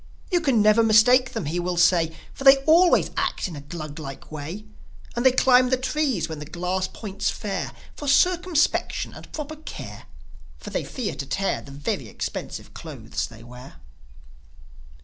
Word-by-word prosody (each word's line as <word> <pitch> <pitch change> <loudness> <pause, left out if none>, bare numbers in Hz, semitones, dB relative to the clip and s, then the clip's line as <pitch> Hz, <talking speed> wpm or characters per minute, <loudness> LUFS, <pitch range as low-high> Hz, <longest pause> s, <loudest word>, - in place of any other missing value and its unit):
"You 350 -1 +3
can 260 -8 +3
never 215 +2 +5
mistake 230 +4 +5
them," - - -3
he 165 +5 -2
will 175 0 -2
say; 170 -2 +3 0.2
"For - - -8
they 270 0 +9
always 335 +4 +5
act - - -1
in 175 - -8
a 145 - -7
Gluglike 150 -2 -8
way. 155 +8 -6 0.5
And 240 - -1
they 260 - +7
climb 255 0 +4
the 260 - +2
trees 265 - -1
when 160 -2 -6
the 150 - -7
glass 180 +4 -2
points 200 -1 -4
fair, 200 -3 -4 0.3
With 290 - -2
circumspection 350 +1 +2
and - - -12
proper 310 0 -6
care, 310 - -9 0.5
For - - -9
they - - -1
fear 240 -6 -4
to 135 - -5
tear 195 +6 -1
The - - -14
very 140 +1 -3
expensive - - -6
clothes - - -5
they 115 -1 -14
wear." 125 +2 -12
205 Hz, 170 wpm, -24 LUFS, 160-265 Hz, 0.5 s, they